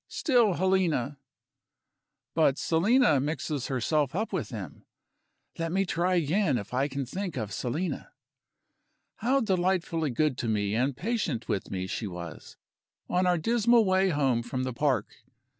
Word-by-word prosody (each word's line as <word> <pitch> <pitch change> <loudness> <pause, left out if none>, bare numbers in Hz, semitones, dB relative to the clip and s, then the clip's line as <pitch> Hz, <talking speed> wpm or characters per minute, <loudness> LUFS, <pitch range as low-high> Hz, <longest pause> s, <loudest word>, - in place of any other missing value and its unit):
Still 240 - +2
Helena! 170 -8 +1 1.1
But 155 -4 +3
Selina 170 - +3
mixes 145 -1 -2
herself 140 +3 0
up 215 +2 -2
with 150 - -2
them. 95 - -8 0.8
Let 165 0 -1
me 195 +2 +1
try 180 +1 +1
again 165 -2 +2
if 105 +1 -7
I 135 +3 +1
can 140 -1 -4
think 180 +4 -4
of 105 -4 -3
Selina. 150 - -3 1.1
How 265 +4 +2
delightfully 180 - 0
good 135 +1 0
to 120 - -2
me 105 -2 0
and 130 +3 0
patient 180 - -2
with 95 - -2
me 95 -1 -3
she 105 +3 -4
was, 85 -3 -8 0.5
on 180 +1 +2
our 180 -1 +3
dismal 230 +5 +3
way 190 0 +3
home 135 -7 +1
from 125 +2 -3
the 130 -1 -3
park! 130 -3 0
155 Hz, 145 wpm, -28 LUFS, 125-185 Hz, 1.1 s, But